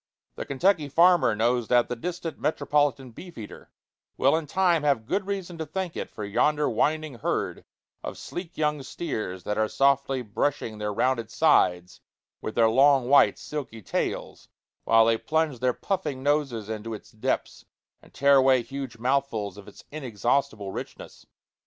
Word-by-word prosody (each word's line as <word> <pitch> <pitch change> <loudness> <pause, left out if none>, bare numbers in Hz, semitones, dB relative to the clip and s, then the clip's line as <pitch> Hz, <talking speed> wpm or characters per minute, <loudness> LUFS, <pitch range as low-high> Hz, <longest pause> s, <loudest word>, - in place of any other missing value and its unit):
The - - -7
Kentucky 155 +1 +1
farmer 170 -6 +4
knows 120 +1 +1
that 120 -1 +3
the 125 - -3
distant 175 +5 -5
metropolitan 145 -4 0
beef 175 +9 -12
eater 110 -2 -10 0.5
will 135 +3 +4
in 160 -2 -2
time 175 0 +2
have 140 -7 +1
good 190 - -2
reason 185 -4 -4
to 160 - -3
thank 180 +2 -4
it - - -4
for 105 - -7
yonder 150 +9 +1
winding 155 -4 -1
herd - - -2 0.4
of - - -6
sleek 175 -1 -7
young 150 -2 0
steers 110 - -5
that 105 +1 -2
are 110 - +2
softly 135 0 +1
brushing 115 0 -2
their 105 0 -2
rounded 115 +1 0
sides 90 - +2 0.4
with 110 - -5
their 115 -1 +5
long, 135 +2 +4
white, 145 - +5
silky 130 -8 -7
tails, - - -3 0.4
while 115 0 +5
they 115 0 +2
plunge 160 -5 -1
their 125 +1 +2
puffing 150 -4 -3
noses 140 -7 0
into 110 0 -5
its - - -13
depths 110 - -3 0.4
and - - -20
tear 140 0 +4
away 130 -2 +4
huge 135 -3 -7
mouthfuls 125 -4 -1
of 100 -1 -13
its - - -14
inexhaustible 120 -5 -1
richness. - - -9
135 Hz, 160 wpm, -26 LUFS, 115-150 Hz, 0.5 s, their